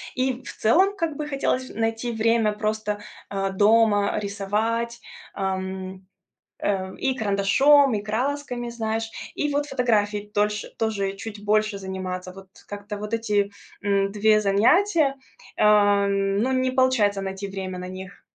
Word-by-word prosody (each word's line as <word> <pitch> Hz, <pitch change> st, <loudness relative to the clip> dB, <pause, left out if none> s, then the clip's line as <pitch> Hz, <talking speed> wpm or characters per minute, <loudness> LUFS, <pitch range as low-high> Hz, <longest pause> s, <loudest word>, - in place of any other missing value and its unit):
И 260 Hz, 0 st, -1 dB
в -, -, -8 dB
целом 380 Hz, -, +3 dB
как 330 Hz, -6 st, -2 dB
бы 300 Hz, -1 st, -4 dB
хотелось 265 Hz, -2 st, -1 dB
найти 225 Hz, +2 st, -2 dB
время 225 Hz, -1 st, +2 dB
просто, 215 Hz, -1 st, -2 dB, 0.3 s
э, 195 Hz, -1 st, -1 dB
дома 205 Hz, 0 st, +3 dB
рисовать, 215 Hz, +4 st, -2 dB, 0.3 s
эм, 190 Hz, 0 st, -4 dB, 0.5 s
э, 190 Hz, -2 st, -2 dB
и 265 Hz, -1 st, 0 dB
карандашом, 250 Hz, +6 st, +4 dB
и 205 Hz, -, -1 dB
красками, 245 Hz, +2 st, -2 dB
знаешь. 225 Hz, -1 st, -3 dB, 0.3 s
И 295 Hz, -1 st, -1 dB
вот 290 Hz, 0 st, 0 dB
фотографией 210 Hz, -6 st, 0 dB
дольше 210 Hz, +1 st, 0 dB
тоже 200 Hz, -3 st, -1 dB
чуть 205 Hz, 0 st, -8 dB
больше 215 Hz, 0 st, +1 dB
заниматься. 185 Hz, -1 st, -5 dB
Вот 190 Hz, 0 st, -13 dB, 0.2 s
как-то 205 Hz, 0 st, -6 dB
вот 210 Hz, +2 st, -6 dB
эти, 205 Hz, -3 st, 0 dB, 0.3 s
м, 200 Hz, -1 st, +1 dB
2 215 Hz, +1 st, +3 dB
занятия, 275 Hz, -, +3 dB, 0.4 s
эм, 200 Hz, -1 st, +3 dB
ну, 260 Hz, +2 st, +1 dB
не 255 Hz, 0 st, +1 dB
получается 235 Hz, -7 st, +2 dB
найти 195 Hz, +1 st, -5 dB
время 190 Hz, -2 st, -5 dB
на 180 Hz, -, -6 dB
них. 185 Hz, +1 st, -10 dB
210 Hz, 135 wpm, -24 LUFS, 200-235 Hz, 0.5 s, карандашом